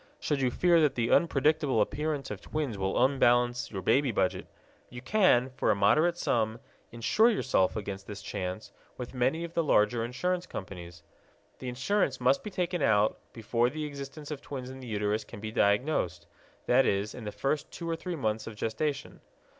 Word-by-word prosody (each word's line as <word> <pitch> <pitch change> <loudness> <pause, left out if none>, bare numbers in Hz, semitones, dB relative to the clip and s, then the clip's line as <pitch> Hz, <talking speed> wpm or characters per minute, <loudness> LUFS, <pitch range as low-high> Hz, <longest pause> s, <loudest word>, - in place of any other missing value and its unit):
Should 145 -2 -1
you 130 - +2
fear 170 +5 +3
that 150 -3 +2
the 115 -1 0
unpredictable 150 -4 +3
appearance 145 +5 -1
of - - -6
twins 150 -7 -3
will 95 +5 +2
unbalance 120 -2 +2
your 95 -3 -6
baby 135 +7 +3
budget, - - -1 0.4
you 125 - -8
can, 130 - +3
for 130 - -1
a - - +4
moderate 155 +13 +3
sum, 110 -7 0 0.3
insure 120 - +3
yourself 130 - +1
against 100 -2 -5
this 100 -2 -8
chance 95 0 -5 0.3
with 125 0 -7
many 130 +6 0
of 170 0 -7
the 170 - +1
larger 115 -4 +3
insurance 180 +9 -2
companies. 85 - -8 0.6
The 130 - -5
insurance 135 +2 0
must 130 +2 +2
be 210 - -5
taken 180 -3 -2
out 105 -4 +3
before 120 +1 0
the 155 +3 -4
existence 145 +1 -8
of 145 - -5
twins 130 -2 -7
in 130 - -9
the 130 - -9
uterus 105 0 -1
can - - -11
be 110 +1 -5
diagnosed 105 - +1 0.4
that 125 +2 +4
is, 100 +1 0
in 120 - -8
the 105 - -4
first 140 +5 -2
two 170 - -7
or 165 - 0
three 180 +1 -5
months 110 -6 -2
of 115 - -7
gestation. 115 +8 -3
125 Hz, 185 wpm, -29 LUFS, 110-150 Hz, 0.6 s, a